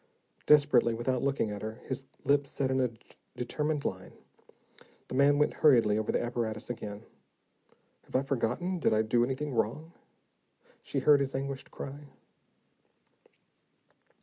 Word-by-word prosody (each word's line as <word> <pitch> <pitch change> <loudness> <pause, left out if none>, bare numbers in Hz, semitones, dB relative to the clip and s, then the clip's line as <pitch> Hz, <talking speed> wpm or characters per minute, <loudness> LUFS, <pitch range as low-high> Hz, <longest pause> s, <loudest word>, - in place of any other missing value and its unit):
Desperately, 140 -6 +5
without 125 +2 -1
looking 135 -6 0
at 105 -1 -6
her, 110 0 -4
his 130 0 -4 0.2
lips 140 -1 +2
set 135 -1 -1
in 130 0 +2
a 125 - +2 0.5
determined 150 +4 -2
line, 95 0 -4 1.0
the - - -6
man 140 +2 +4
went 150 - +2
hurriedly 120 -8 +5
over 110 0 -1
the - - +1
apparatus 120 -2 -3
again. 105 -3 -7 1.0
"Have - - -11
I 130 - +3
forgotten, 140 +8 -1
did 130 - +2
I 110 - +3
do 120 +2 +2
anything 135 +3 -2
wrong?" 130 +9 -1 0.9
she 135 - -3
heard 145 +1 +6
his 135 -1 -2
anguished 135 0 -4
cry. 145 +2 -8
130 Hz, 140 wpm, -30 LUFS, 115-145 Hz, 1.0 s, heard